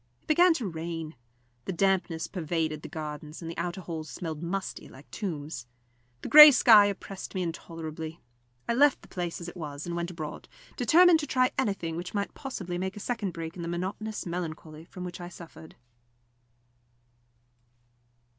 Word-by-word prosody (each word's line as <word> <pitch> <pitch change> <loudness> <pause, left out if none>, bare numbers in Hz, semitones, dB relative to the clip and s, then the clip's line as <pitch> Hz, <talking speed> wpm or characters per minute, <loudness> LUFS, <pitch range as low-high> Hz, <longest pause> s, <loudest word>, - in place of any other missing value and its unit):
It - - -34
began 345 +2 +5
to 250 - -3
rain. 165 -2 -5 0.5
The - - -2
dampness 175 -3 +1
pervaded 160 -3 -2
the - - -8
gardens, 150 -1 -7
and 165 -1 -6
the - - -10
outer 175 +2 -3
halls 160 -2 -6
smelled 160 -3 -5
musty, 190 +3 -4
like 135 +2 -15
tombs; 150 - -5 0.6
the - - -4
grey 300 0 +12
sky 220 -6 +7
oppressed 195 -1 -6
me 185 - 0
intolerably. 160 -1 -6 0.5
I - - +1
left 280 +3 +4
the - - -14
place 175 -2 -4
as 170 - -7
it 175 - -8
was 150 -3 -6
and 170 0 -4
went 170 0 -2
abroad, 160 -4 -7 0.3
determined 345 0 +6
to 295 - -4
try 255 -1 +2
anything 195 -10 -1
which 180 +4 -6
might 200 0 -2
possibly 185 -10 -5
make 190 +2 -3
a - - -5
second 220 -3 -2
break 165 0 -6
in 180 - -7
the 170 - -4
monotonous 190 +5 -4
melancholy 160 -2 -6
from 180 +1 -9
which 180 0 -7
I 175 - -6
suffered. 160 -2 -12
175 Hz, 170 wpm, -28 LUFS, 160-200 Hz, 0.6 s, grey